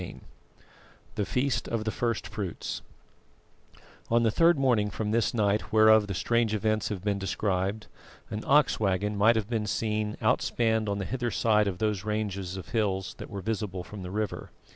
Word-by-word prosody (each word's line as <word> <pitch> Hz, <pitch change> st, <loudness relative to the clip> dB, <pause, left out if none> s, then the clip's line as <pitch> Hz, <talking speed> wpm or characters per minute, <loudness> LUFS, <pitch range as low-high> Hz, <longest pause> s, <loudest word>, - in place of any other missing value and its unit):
CHAPTER -, -, -6 dB
V -, -, -20 dB, 0.9 s
THE 105 Hz, -, -1 dB
FEAST 125 Hz, +6 st, 0 dB
OF 115 Hz, -2 st, -2 dB
THE 110 Hz, -, -1 dB
FIRST 115 Hz, 0 st, -1 dB
FRUITS 105 Hz, -5 st, -5 dB, 1.3 s
On 115 Hz, 0 st, +3 dB
the 115 Hz, -, +3 dB
third 165 Hz, +6 st, +4 dB
morning 120 Hz, -6 st, +2 dB
from 105 Hz, +1 st, -3 dB
this 115 Hz, 0 st, +2 dB
night 105 Hz, -2 st, 0 dB
whereof 110 Hz, -1 st, +6 dB
the 100 Hz, -, -3 dB
strange 115 Hz, +2 st, +1 dB
events 110 Hz, +1 st, 0 dB
have 100 Hz, -4 st, -5 dB
been 100 Hz, -1 st, 0 dB
described, 95 Hz, +1 st, -1 dB, 0.5 s
an 105 Hz, 0 st, -4 dB
ox 145 Hz, 0 st, +4 dB
waggon 105 Hz, 0 st, 0 dB
might 110 Hz, +3 st, +5 dB
have 110 Hz, -3 st, -1 dB
been 110 Hz, -2 st, -2 dB
seen 105 Hz, -1 st, -1 dB
outspanned 110 Hz, -2 st, +1 dB
on 100 Hz, -, -1 dB
the 100 Hz, -, -3 dB
hither 120 Hz, +1 st, -2 dB
side 105 Hz, -2 st, +2 dB
of 95 Hz, -3 st, -2 dB
those 105 Hz, -2 st, -1 dB
ranges 100 Hz, -3 st, -3 dB
of 95 Hz, -, -8 dB
hills 95 Hz, -5 st, -1 dB
that -, -, -8 dB
were 100 Hz, -, -5 dB
visible 100 Hz, -3 st, -3 dB
from 100 Hz, +2 st, -9 dB
the 90 Hz, -, -6 dB
river. 105 Hz, +1 st, -3 dB
105 Hz, 185 wpm, -28 LUFS, 100-110 Hz, 1.3 s, whereof